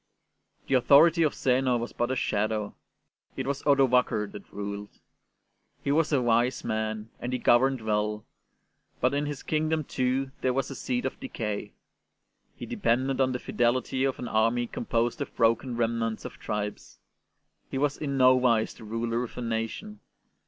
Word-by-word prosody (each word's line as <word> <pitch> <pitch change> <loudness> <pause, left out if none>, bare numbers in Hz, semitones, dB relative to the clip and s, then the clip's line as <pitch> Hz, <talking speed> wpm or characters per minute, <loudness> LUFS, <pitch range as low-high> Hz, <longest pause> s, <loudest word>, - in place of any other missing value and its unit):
The - - -2
authority 145 +7 +6
of 155 -3 +2
Zeno 130 -1 +2
was 120 +1 -5
but 120 +1 -1
a 130 - 0
shadow; 110 -2 -1 0.6
it 130 - -2
was 140 +1 -2
Odovaker 125 -6 +3
that 100 - -11
ruled. 100 0 -5 0.9
He 140 - 0
was 155 +2 +2
a 140 - +3
wise 120 +2 +2
man, 110 0 -3
and 120 - -4
he 125 - 0
governed 130 +1 +3
well; 105 0 -1 0.7
but 125 +2 +2
in 145 +1 0
his 145 -2 -5
kingdom, 155 0 0
too, 130 0 -1
there 130 - +1
was 135 -1 -1
a - - -6
seed 250 -1 -2
of - - -3
decay. 110 - -4 0.8
He - - -7
depended 130 +3 0
on 130 0 +3
the 125 - -1
fidelity 125 +2 0
of 135 -1 0
an 125 - -5
army 115 +2 +2
composed 115 0 -1
of - - -5
broken 115 +1 +2
remnants 115 -1 -1
of - - -8
tribes; 105 -12 -4 0.7
he - - -3
was 145 +1 +1
in 140 -2 -3
no 130 0 +6
wise 120 -3 +2
the 115 - -14
ruler 115 +2 -2
of 120 - -8
a - - -3
nation. 115 - -4
125 Hz, 165 wpm, -27 LUFS, 115-135 Hz, 0.9 s, authority